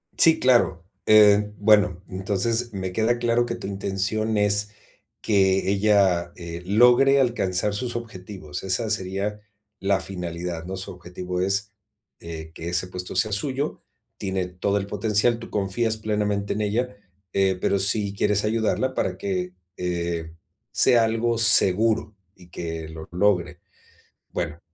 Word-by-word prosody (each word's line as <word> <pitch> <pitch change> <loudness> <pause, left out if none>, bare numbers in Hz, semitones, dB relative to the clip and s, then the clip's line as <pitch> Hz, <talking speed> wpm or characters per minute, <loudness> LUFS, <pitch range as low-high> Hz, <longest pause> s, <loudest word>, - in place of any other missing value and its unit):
Sí, 165 -1 +6
claro. 120 -9 +3 0.2
Eh, 105 -1 +6
bueno, 105 -4 +3
entonces, 105 +5 -1
me 95 -2 -4
queda 110 +5 +1
claro 120 0 +2
que 120 0 -4
tu - - -7
intención 100 +3 -2
es 105 0 +1 0.5
que 95 -2 +2
ella, 100 -4 +2
eh, 85 0 -7
logre 125 +7 +5
alcanzar 105 -5 0
sus 120 +2 -3
objetivos, 95 -8 -7
esa 95 +4 0
sería 100 0 -2 0.4
la 95 0 +1
finalidad, 90 -3 -5
¿no?, 95 +2 -5
su 95 - -4
objetivo 90 +1 -6
es, 100 +2 -1 0.5
eh, 80 -1 -8
que 85 - -6
ese 90 +1 -1
puesto 90 0 -6
sea 105 +4 +1
suyo, 135 +8 -2 0.4
tiene 95 -2 -2
todo 90 +3 -2
el 100 - -4
potencial, 105 +3 +1
tú 115 - -10
confías 105 +3 -1
plenamente 105 -2 -1
en 105 - -3
ella, 110 +2 -1 0.4
eh, 95 -1 +2
pero 100 - +1
sí 100 0 +2
quieres 105 +1 +1
ayudarla 115 +4 0
para 95 -6 -2
que, 90 -2 -3 0.2
eh, 85 -2 -3 0.4
sea 120 -2 +4
algo 115 +1 0
seguro, 110 0 +4 0.2
y 90 - -17
que 80 -2 -5
lo 80 0 -10
logre. 90 -2 +1 0.7
Bueno, 85 -2 -4
100 Hz, 140 wpm, -24 LUFS, 90-110 Hz, 0.7 s, Sí